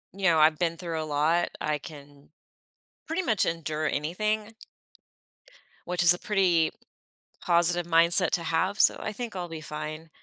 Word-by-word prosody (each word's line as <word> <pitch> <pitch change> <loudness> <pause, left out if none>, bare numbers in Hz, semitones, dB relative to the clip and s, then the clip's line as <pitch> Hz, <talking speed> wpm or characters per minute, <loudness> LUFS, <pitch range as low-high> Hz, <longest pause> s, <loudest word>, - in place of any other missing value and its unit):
You 195 +1 -10
know, 170 -4 +4
I've 155 0 +4
been 170 -1 -1
through 165 -3 -4
a - - -4
lot. 155 +4 0
I 150 0 -1
can 145 -1 -14 0.8
pretty 330 +4 -2
much 220 - +1
endure 155 -1 -3
anything 215 +9 -2 1.3
which 175 0 0
is 175 0 +8
a 175 - -7
pretty 180 -6 +1 0.7
positive 175 0 +1
mindset 170 +1 +5
to 170 - -1
have. 185 +6 -1
So, - - +4
I - - -4
think 225 0 -7
I'll 175 -2 -5
be 160 -1 -8
fine. 155 +1 -7
170 Hz, 160 wpm, -26 LUFS, 155-185 Hz, 1.3 s, is